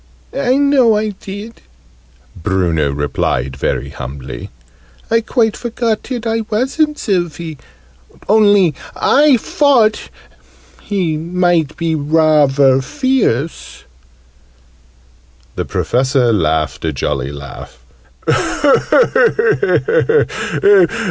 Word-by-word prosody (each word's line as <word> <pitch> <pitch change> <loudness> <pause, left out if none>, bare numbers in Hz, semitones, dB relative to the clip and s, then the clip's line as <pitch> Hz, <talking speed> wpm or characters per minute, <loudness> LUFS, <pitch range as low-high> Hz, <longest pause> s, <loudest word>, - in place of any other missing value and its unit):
"I 270 -1 +1
know 275 -6 +3
I 215 0 -1
did," 205 +3 -9 0.7
Bruno 85 -4 0
replied 70 -2 -2
very 65 - -2
humbly. 65 -2 -8 0.6
"I 230 0 +3
quite 225 -1 0
forgotted 235 0 -3
I 225 0 0
wasn't 275 +7 0
Sylvie. 170 - -3 0.7
Only 205 -5 +4 0.2
I 285 -1 +4
fought 235 -3 +1 0.7
he 180 -7 -2
might 175 -1 0
be 165 -1 -1
rarver 145 -3 +3
fierce!" 245 - -2 1.7
The - - -3
Professor 130 -2 +1
laughed 80 -7 -1
a 80 - -1
jolly 65 -1 -3
laugh. 70 -1 -10
170 Hz, 80 wpm, -15 LUFS, -, 1.7 s, Only